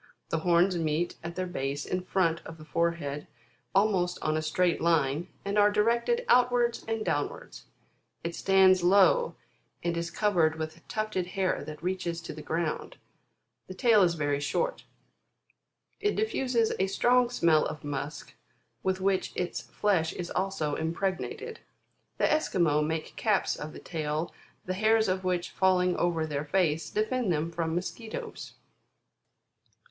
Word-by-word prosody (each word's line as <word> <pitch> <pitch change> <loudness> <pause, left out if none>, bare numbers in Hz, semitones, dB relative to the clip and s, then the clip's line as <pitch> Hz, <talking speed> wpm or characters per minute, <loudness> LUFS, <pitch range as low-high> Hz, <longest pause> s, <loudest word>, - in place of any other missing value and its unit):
The 165 - 0
horns 175 +2 +3
meet 160 +2 -1
at 170 +1 -6
their 185 - -2
base 140 -5 -3
in 185 - -2
front 170 -3 +1
of 160 - -9
the 155 - -12
forehead 160 -3 -1 0.5
almost 190 -3 +2
on 155 - +1
a 155 - 0
straight 175 +3 +1
line, 160 -1 +2 0.2
and 200 +1 +1
are 205 0 +6
directed 235 - +1
outwards 245 -1 +3
and 225 -1 -2
downwards. 145 0 -3 0.6
It 170 0 -3
stands 190 0 +5
low, 200 - +4 0.5
and 170 -1 0
is 170 0 -2
covered 170 -6 +2
with 160 +1 -7
tufted 215 -4 -2
hair 185 0 -1
that 155 +1 -9
reaches 180 -2 -2
to 165 - -7
the 155 - -8
ground. 160 +1 -3 0.7
The 185 - -8
tail 225 0 +5
is 175 -2 +3
very 145 -2 0
short. 485 - -1 1.1
It 415 0 0
diffuses 255 - +1
a 190 - +2
strong 245 +5 +3
smell 165 -10 +3
of 155 0 -7
musk 145 +1 -5 0.5
with 190 0 -1
which 190 -1 +1
its 180 -1 -2
flesh 185 -6 0
is 175 -1 -5
also 190 -6 -1
impregnated. 195 - -3 0.6
The - - -2
Esquimaux 170 - +2
make 160 +1 -3
caps 210 -3 +1
of 150 +1 -7
the - - -10
tail, 155 0 -3 0.3
the 185 - -2
hairs 220 +2 +3
of 185 0 -1
which 180 -1 -1
falling 180 -1 +2
over 170 -2 +1
their 150 -1 -3
face, 160 -2 +1
defend 220 0 0
them 160 +1 -1
from 165 -1 -2
mosquitoes. 220 +5 -5
180 Hz, 150 wpm, -29 LUFS, 160-205 Hz, 1.1 s, are